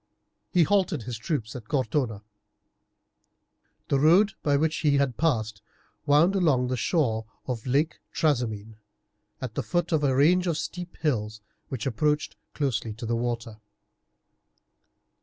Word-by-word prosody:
He 180 -3 +4
halted 185 - +1
his 115 -1 -5
troops 115 -4 -3
at 115 -4 -8
Cortona. 125 -5 -1 1.7
The 140 - +2
road 180 +8 +5
by 145 -1 +2
which 160 +2 +1
he 145 -3 +2
had 140 -4 +1
passed 110 -10 0 0.5
wound 150 +6 +5
along 140 -9 +2
the 130 - 0
shore 115 - 0 0.2
of 125 -2 -4
Lake 145 +6 +1
Trasimene, 115 -8 -1 0.6
at 125 -4 -4
the - - -1
foot 175 -1 -1
of 155 -2 +2
a 135 -2 +2
range 180 +7 +4
of 165 -3 0
steep 175 +2 -6
hills, 110 -8 -1 0.3
which 125 -4 -4
approached 150 +4 0 0.2
closely 120 -6 -1
to 115 +3 -7
the 115 +1 0
water. 115 -1 -3
135 Hz, 140 wpm, -26 LUFS, 115-155 Hz, 1.7 s, road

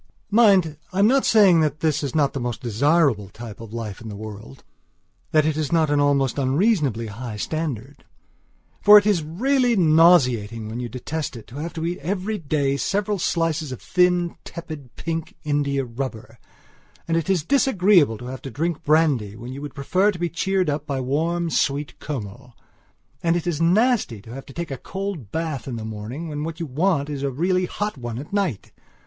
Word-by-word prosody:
Mind, 195 -8 +4
I 185 - -6
am 200 - +5
not 265 +4 +3
saying 200 -7 +6
that 155 -1 0
this 155 -3 +1
is 140 -1 -4
not 145 -3 +2
the 135 - -3
most 120 -1 -3
desirable 125 - +2
type 110 +1 -10
of 115 -2 -9
life 110 -4 -6
in 110 - -8
the 105 - -7
world; 105 -10 -9 0.7
that 155 -1 +3
it 155 -1 +1
is 155 -3 -2
not 160 -3 +2
an 145 - +3
almost 140 -2 +2
unreasonably 140 - +1
high 110 +1 -6
standard. 145 -1 -4 0.8
For 210 +1 +9
it 205 - +4
is 205 -5 +3
really 245 - +1
nauseating, 130 - +4
when 115 +2 -5
you 120 -1 -4
detest 145 +5 -4
it, 115 - -10
to 125 - -11
have 165 +3 -4
to 160 -1 -4
eat 175 +1 -2
every 200 +6 -2
day 140 -3 0
several 205 +4 -1
slices 165 -4 0
of 130 - -6
thin, 180 -1 +1
tepid, 155 -7 -9
pink 165 -1 -4
india 140 -2 0
rubber, 115 -2 -6 0.7
and 165 - +1
it 165 +1 -1
is 185 -5 +2
disagreeable 190 - +3
to 125 - -10
have 130 +1 -6
to 135 - -7
drink 160 +6 -2
brandy 145 -10 +2
when 120 +3 -8
you 140 - -7
would 145 -2 -7
prefer 185 +9 +2
to 200 - -2
be 175 0 -1
cheered 190 +2 0
up 145 0 -2
by 140 -3 -2
warm, 165 +6 -1
sweet 140 -2 -1
Kümmel. 125 -2 -7 0.7
And 165 0 +2
it 175 - -2
is 165 -3 -1
nasty 195 - +2
to 115 - -10
have 135 +1 -9
to 135 - -11
take 170 0 -5
a 135 - -3
cold 190 - -6
bath 160 -5 -3
in 125 - -4
the 110 -1 -5
morning 110 +9 -6
when 150 -1 -4
what 165 +1 -5
you 170 - -2
want 150 +1 0
is 145 -2 -4
really 175 +7 +1
a - - -9
hot 205 -8 -3
one 120 -2 -5
at 145 +8 -8
night. 190 - -1
150 Hz, 200 wpm, -23 LUFS, 125-175 Hz, 0.8 s, For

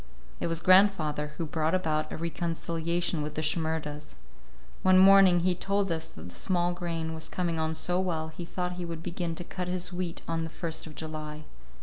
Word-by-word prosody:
It - - -1
was 165 0 +1
grandfather 170 -6 +4
who 165 - -2
brought 160 +2 0
about 155 -4 0
a - - -4
reconciliation 170 0 -1
with 150 0 -4
the 155 - -1
Shimerdas. 155 -1 -2 0.7
One 185 0 +5
morning 190 -2 +7
he 180 +1 +3
told 195 +1 0
us 160 -1 -2
that - - -10
the - - -13
small 175 -1 0
grain 165 -2 -3
was 160 0 -5
coming 170 -3 -1
on 160 0 0
so 180 +3 0
well, 165 -4 -1
he 160 +2 -7
thought 180 +1 -3
he 180 - -4
would 165 -1 -6
begin 170 -1 -3
to 175 - -5
cut 180 +1 -5
his 180 0 -2
wheat 175 -2 -4
on 165 0 -1
the 160 - -4
first 160 0 -4
of 155 - -11
July. 155 0 -6
165 Hz, 200 wpm, -29 LUFS, 160-180 Hz, 0.7 s, morning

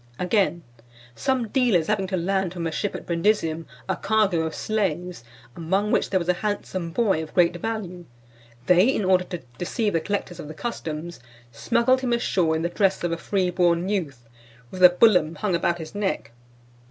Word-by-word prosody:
Again: 180 -2 +1 0.5
"Some 255 - -1
dealers 230 - +2
having 200 -1 0
to 185 0 -2
land 190 0 -1
from 170 -2 -4
a 165 - -1
ship 195 +6 -2
at - - -7
Brundusium 170 -2 0 0.2
a - - 0
cargo 200 -4 +1
of 160 - -6
slaves, 180 - -2 0.3
among 190 +5 0
which - - +1
there 190 - +2
was 170 - -5
a 180 - +4
handsome 195 -4 -3
boy 195 -3 +1
of 160 - -9
great 175 -1 +4
value, 180 -4 -5 0.6
they, 180 +4 +5
in 240 -6 +1
order 185 -1 +3
to 175 -2 -7 0.2
deceive 205 +4 -1
the 165 - +1
collectors 195 -2 -3
of - - -7
the 155 - -9
customs, 170 -8 -5 0.3
smuggled 235 - +1
him 250 -2 0
ashore 180 -9 +1
in 160 - -2
the 170 - 0
dress 195 0 +1
of 175 - 0
a 165 - -1
freeborn 180 -2 +1
youth, 140 - -3 0.4
with 185 - -7
the 180 - +10
bullum 180 -4 +4
hung 185 +5 -2
about 170 0 +1
his 160 -2 -8
neck. 195 - -2
180 Hz, 185 wpm, -24 LUFS, 170-205 Hz, 0.6 s, the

